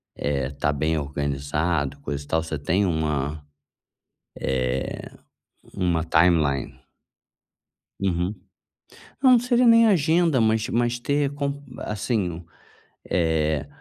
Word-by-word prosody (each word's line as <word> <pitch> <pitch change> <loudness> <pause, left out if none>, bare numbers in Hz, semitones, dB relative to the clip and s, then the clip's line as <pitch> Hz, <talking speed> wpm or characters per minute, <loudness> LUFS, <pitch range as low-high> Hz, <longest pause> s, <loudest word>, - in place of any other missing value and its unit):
Eh, 70 -2 -1
tá 75 +1 -1
bem 75 +3 0
organizado, 70 +1 -2
coisa 70 0 -4
e - - -17
tal, 80 0 +1
você 80 -2 -4
tem 90 +8 +1
uma, 75 -2 -2 1.0
eh, 65 0 -2 0.6
uma 85 -3 0
timeline? 75 -6 +2 1.2
Uhum. 90 +1 0 0.9
Não, 260 -1 +7
não 245 - +7
seria 245 0 +2
nem 230 0 +7
agenda, 165 - +3
mas 110 +1 +2
mas 120 0 0
ter 140 +2 0
con 140 0 -3 0.2
assim, 100 -6 -2 0.7
eh, 80 - +1
80 Hz, 110 wpm, -24 LUFS, 70-120 Hz, 1.2 s, Não